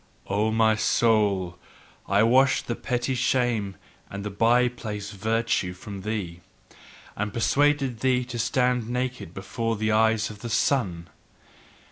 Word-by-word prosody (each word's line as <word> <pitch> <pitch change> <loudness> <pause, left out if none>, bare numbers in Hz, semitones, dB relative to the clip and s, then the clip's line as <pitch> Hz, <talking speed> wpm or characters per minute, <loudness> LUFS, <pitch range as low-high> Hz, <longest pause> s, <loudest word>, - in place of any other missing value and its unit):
O 105 +2 0
my 110 0 +3
soul, 105 -5 +1 0.5
I 100 +2 +3
washed 130 +4 +3
the 120 - -2
petty 125 +2 -2
shame 120 -5 0 0.3
and 100 +1 -6
the 105 - -3
by 120 +4 +3
place 105 -4 -6
virtue 110 -2 -1
from 95 +2 -9
thee, 95 -5 -4 0.7
and 105 0 -3
persuaded 135 +1 +1
thee 125 -1 +1
to 120 -1 -6
stand 125 -1 +1
naked 125 -7 -3
before 115 +4 -3
the 110 +1 -1
eyes 110 0 +2
of 105 - -12
the 120 - -6
sun. 95 -10 0
110 Hz, 135 wpm, -25 LUFS, 100-125 Hz, 0.7 s, my